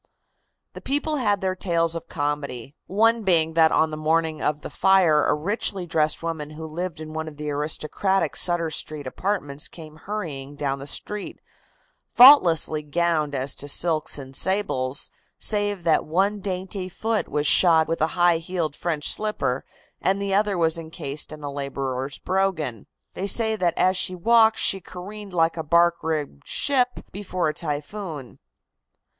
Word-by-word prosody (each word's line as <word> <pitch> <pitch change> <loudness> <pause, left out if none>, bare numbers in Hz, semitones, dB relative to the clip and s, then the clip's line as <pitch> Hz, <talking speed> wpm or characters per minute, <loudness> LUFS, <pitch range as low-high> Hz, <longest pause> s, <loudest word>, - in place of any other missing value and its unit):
The - - -9
people 295 +2 -1
had 205 -6 +1
their 190 -1 0
tales 170 -3 0
of 165 - -7
comedy, 145 -4 -3
one 225 +4 +3
being 165 -5 +2
that 160 -1 +5
on 160 0 +2
the - - -4
morning 160 0 0
of 150 0 -1
the - - -8
fire 180 -6 +4
a - - +3
richly 190 +3 -1
dressed 155 -1 0
woman 160 -3 -4
who 155 +1 -8
lived 165 +1 -5
in 155 0 -8
one 160 0 -4
of 150 -2 -9
the 150 0 -4
aristocratic 155 +4 -1
Sutter 170 -2 +1
Street 150 -1 -4
apartments 145 -2 -2
came 155 -2 -12
hurrying 155 -8 -6
down 140 -1 -2
the 140 - -7
street, 210 +6 -3 0.7
faultlessly 175 - +6
gowned 155 -1 0
as 135 +1 0
to 145 - -5
silks 155 +1 +1
and 135 -1 -9
sables, 140 -10 0 0.3
save 205 -3 0
that 165 -2 +3
one 195 +6 0
dainty 185 -1 -4
foot 220 +4 -2
was 150 0 -1
shod 160 0 +5
with 165 -1 -2
a 160 - +4
high 175 -1 +4
heeled 165 -3 -3
French 160 -4 -2
slipper 210 -12 -1 0.4
and 195 +1 +1
the 200 -1 -2
other 205 -1 +2
was 165 0 +1
incased 160 -3 -5
in 155 -1 -10
a 145 - -4
laborer's 140 -1 -4
brogan. 170 - -1 0.3
They 195 - -3
say 220 +2 +3
that 175 -5 0
as 185 +1 +3
she 185 0 -1
walked 225 +4 +4
she 195 - +1
careened 195 +3 -9
like 165 -1 +2
a 160 - -2
bark 170 +2 +3
rigged 150 - -4
ship 250 -3 +1
before 185 -4 -2
a - - -3
typhoon. 150 - -6
165 Hz, 165 wpm, -24 LUFS, 150-190 Hz, 0.7 s, faultlessly